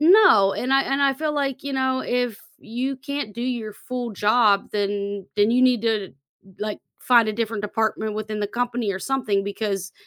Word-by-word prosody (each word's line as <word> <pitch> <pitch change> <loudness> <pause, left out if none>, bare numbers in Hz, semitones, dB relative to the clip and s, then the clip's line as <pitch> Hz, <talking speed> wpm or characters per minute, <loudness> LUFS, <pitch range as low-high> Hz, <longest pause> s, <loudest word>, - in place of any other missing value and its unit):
No, 320 - +6
and 255 +6 -2
I 270 0 +5
and 275 +2 0
I 275 -1 +4
feel 300 +3 -2
like, 275 -2 -2
you 280 - -3
know, 260 -1 0
"If 245 -3 -1 0.2
you 255 +4 -3
can't 280 -5 -5
do 235 - -5
your 235 -4 -3
full 245 +2 -5
job, 210 0 +3
then 200 -1 -2
then 205 +1 +4
you 250 +2 +3
need 250 -3 +4
to, 220 -4 -1 0.5
like, 210 0 -3 0.2
find 235 -3 +4
a - - 0
different 225 -1 -3
department 220 0 -1
within 215 0 -4
the 205 - 0
company 235 -1 -2
or 190 - -4
something 225 -7 0
because 200 -1 -3
230 Hz, 190 wpm, -23 LUFS, 210-260 Hz, 0.5 s, No